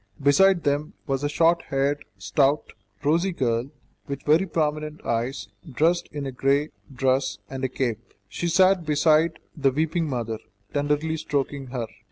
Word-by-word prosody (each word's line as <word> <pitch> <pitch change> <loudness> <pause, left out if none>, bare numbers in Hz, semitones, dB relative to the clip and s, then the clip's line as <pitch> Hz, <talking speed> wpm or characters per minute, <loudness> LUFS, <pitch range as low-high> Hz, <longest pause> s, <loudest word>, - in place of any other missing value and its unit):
Beside 175 +6 +4
them 145 +1 0
was 135 0 -1
a 145 - +1
short 165 +3 +3
haired, 140 +2 0
stout, 135 +10 +1 0.3
rosy 170 +6 +2
girl, 125 -5 -1 0.4
with 140 0 -5
very 160 +6 +3
prominent 155 -2 -1
eyes, 120 0 -2 0.2
dressed 165 +7 +1
in 145 -1 -4
a 135 - -3
grey 140 +4 +1 0.2
dress 130 -4 +1
and 135 0 -5
a 130 - +1
cape; 120 -3 -3
she 175 - -3
sat 185 +1 +4
beside 155 +2 +3 0.2
the 140 -3 +3
weeping 160 +3 0
mother, 115 -4 -3 0.3
tenderly 150 +2 0
stroking 140 -2 -2
her. 125 -2 -3
145 Hz, 150 wpm, -25 LUFS, 130-160 Hz, 0.4 s, Beside